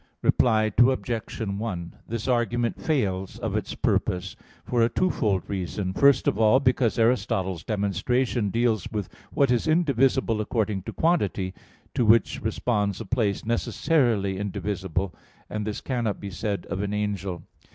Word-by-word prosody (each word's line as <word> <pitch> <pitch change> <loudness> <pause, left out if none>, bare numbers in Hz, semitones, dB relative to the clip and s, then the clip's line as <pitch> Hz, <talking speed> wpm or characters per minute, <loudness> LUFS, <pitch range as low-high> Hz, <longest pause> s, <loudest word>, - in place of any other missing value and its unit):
Reply 110 -3 +3
Obj. 120 -3 +1
1: 100 -4 -4
This 115 +1 -4
argument 120 -1 0
fails 95 - -1
of - - -3
its - - -3
purpose 90 0 0 0.3
for 120 -1 +1
a 115 - +4
twofold 115 - +1
reason. 95 0 -3
First 140 +3 +4
of 105 - +1
all, 110 +4 +5
because 125 -3 +2
Aristotle's 95 -7 +1
demonstration 105 +3 0
deals 115 -1 +1
with 105 -5 -3 0.2
what 140 -3 +2
is 125 +5 +1
indivisible 135 -8 +2
according 105 -2 -1
to - - -4
quantity, 105 - +1 0.4
to - - +1
which 115 +1 +3
responds 105 -3 -1
a - - -5
place 110 -5 0
necessarily 115 - +1
indivisible. 95 -3 -3 0.4
And 105 0 -3
this 105 - -3
cannot 120 -6 -2
be 100 - -6
said 100 +1 -3
of 95 - -1
an 105 0 -2
angel. 100 -4 -3
110 Hz, 140 wpm, -25 LUFS, 100-120 Hz, 0.4 s, all